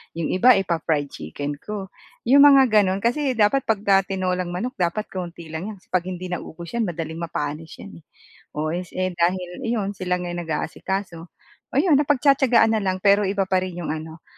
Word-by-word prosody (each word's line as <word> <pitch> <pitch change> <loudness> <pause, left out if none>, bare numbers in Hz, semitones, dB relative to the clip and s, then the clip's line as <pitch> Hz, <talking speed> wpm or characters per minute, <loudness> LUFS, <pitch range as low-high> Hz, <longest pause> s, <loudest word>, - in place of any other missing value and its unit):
yung 165 -1 -2
iba 245 +7 +6
ipapa-fried 160 -5 -1
chicken 145 - -6
ko, 200 -3 -6 0.3
yung 275 +4 +6
mga 270 -5 +6
gano'n. 190 -2 +1
Kasi 260 +2 +1
dapat 225 +6 +2
'pagka 200 -2 +3
tinolang 185 -1 -1
manok, 200 +9 -3
dapat 180 +4 0
kaunti 175 -2 -6
lang 160 +5 -5
'yan 215 - -7
kasi - - -33
'pag 185 -1 +1
hindi 180 0 -6
naubos 170 -1 -6
'yan, 235 -3 0
madaling 160 -1 -5
mapanis 155 -1 -4
'yan 85 -3 -11
eh. - - -24 0.5
Oh, 155 +1 -1
es 175 +1 -5
eh, 185 0 -1
dahil 180 +1 -1
iyon 210 -4 -1
sila 180 -1 -1
nga 180 - -5
yung 175 - -4
nag-aasikaso, 175 +3 -3 0.6
oh - - +4
'yon, 300 -3 +4
napagtiyatiyagaan 270 -5 +3
na 220 - +2
lang, 185 -1 -2
pero 200 0 +4
iba 195 0 0
pa 185 -1 +1
rin 185 -1 -5
yung - - -3
ano, 160 +1 -7
185 Hz, 190 wpm, -23 LUFS, 170-215 Hz, 0.6 s, iba